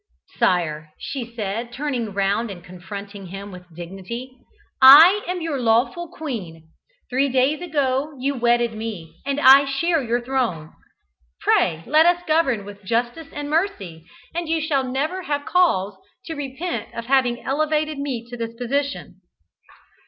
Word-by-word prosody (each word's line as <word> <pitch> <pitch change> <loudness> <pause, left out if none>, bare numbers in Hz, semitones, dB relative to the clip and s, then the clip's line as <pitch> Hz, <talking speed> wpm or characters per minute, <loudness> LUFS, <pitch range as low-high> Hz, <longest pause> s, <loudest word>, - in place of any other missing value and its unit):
"Sire," 155 -4 0
she 245 -4 -6
said, 225 +2 -3
turning 250 -5 -3
round 200 +4 0
and 180 -3 -9
confronting 195 +2 -9
him 195 +3 -8
with 180 -1 -13
dignity, 195 +10 -8 0.5
"I 320 +10 +9
am 360 0 -3
your 320 -4 -2
lawful 240 +9 +1
queen. 185 - -7 0.4
Three 270 +2 +1
days 265 +5 +1
ago 285 -3 -1
you 275 +2 -1
wedded 240 -2 +1
me, 215 -7 -7
and 280 +1 0
I 275 0 +8
share 315 +4 0
your 240 -1 0
throne. 240 -11 -2 0.7
Pray 160 0 +2
let 310 +5 +5
us 350 0 +2
govern 275 -10 +1
with 205 0 -11
justice 240 +9 -2
and 290 0 -5
mercy, 290 - -2 0.3
and 340 -1 -3
you 325 0 +1
shall 300 -4 0
never 310 +8 -2
have 290 -4 -3
cause 210 - +2 0.3
to 325 - -5
repent 290 +4 -5
of 230 - -5
having 250 -2 +2
elevated 305 +1 0
me 260 -5 -3
to - - -5
this 230 -1 -5
position." 255 -5 -3
255 Hz, 145 wpm, -22 LUFS, 205-295 Hz, 0.7 s, I